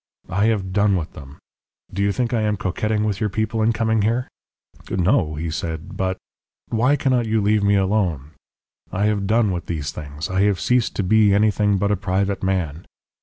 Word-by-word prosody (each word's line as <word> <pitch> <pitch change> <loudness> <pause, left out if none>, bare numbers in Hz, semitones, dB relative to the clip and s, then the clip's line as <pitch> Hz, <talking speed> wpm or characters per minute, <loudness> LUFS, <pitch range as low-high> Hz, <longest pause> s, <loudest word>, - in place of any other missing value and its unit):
'I 100 +2 +1
have 100 -5 0
done 100 0 +3
with 85 -2 -5
them. 70 0 -11 0.6
Do 100 - -2
you 100 0 +2
think 120 +3 -1
I 115 - +1
am 105 -1 0
coquetting 105 +2 -1
with 105 -2 -1
your 105 - 0
people 110 +2 -1
in 110 +1 +3
coming 110 -1 +1
here?' 115 +4 0 0.6
"'No,' 90 - +1
he 80 +2 -3
said; 80 +4 -5
'but 95 0 -1 0.3
' - - -72
"'Why 125 +5 +2
cannot 130 -4 +1
you 110 0 +1
leave 105 +1 +2
me 100 0 +3
alone? 95 -8 0 0.6
I 100 +3 0
have 105 -2 0
done 110 -1 +2
with 85 -1 -4
these 75 -4 -3
things. 75 +1 -6
I 95 0 0
have 100 -2 +2
ceased 125 -2 +1
to 100 - 0
be 105 +1 +4
anything 105 -1 +2
but 100 +2 0
a - - +3
private 95 +1 -1
man.' 90 -5 -2
100 Hz, 200 wpm, -21 LUFS, 95-110 Hz, 0.6 s, be